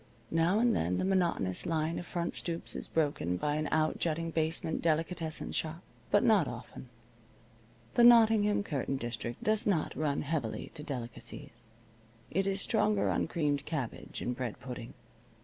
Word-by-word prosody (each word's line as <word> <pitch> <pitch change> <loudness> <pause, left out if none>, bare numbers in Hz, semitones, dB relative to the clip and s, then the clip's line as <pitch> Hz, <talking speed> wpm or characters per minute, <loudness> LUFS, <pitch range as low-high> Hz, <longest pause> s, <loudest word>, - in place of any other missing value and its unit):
Now 165 +4 +3
and 235 +1 +3
then 90 +2 0
the - - 0
monotonous 175 - +1
line 160 0 0
of 175 - -8
front 170 -1 -2
stoops 170 -1 -4
is - - -5
broken 145 - 0
by 150 +8 0
an 155 0 -1
outjutting 160 +1 0
basement 160 0 0
delicatessen 165 0 -1
shop. 165 +2 -3 0.3
But 205 - +4
not 205 - +4
often. 125 +1 -8 1.0
The 240 - +5
Nottingham 220 -4 +6
curtain 140 -6 -2
district 120 -1 -5
does 215 0 +2
not 175 -7 +1
run 145 -2 0
heavily 140 -7 -3
to 150 - -8
delicacies. 120 -3 -8 0.6
It 195 +3 +1
is 195 0 0
stronger 210 -2 +2
on - - 0
creamed 145 -4 -1
cabbage 145 -7 -4
and 125 - -2
bread 125 -3 -4
pudding. 125 -2 -7
160 Hz, 150 wpm, -31 LUFS, 135-185 Hz, 1.0 s, Nottingham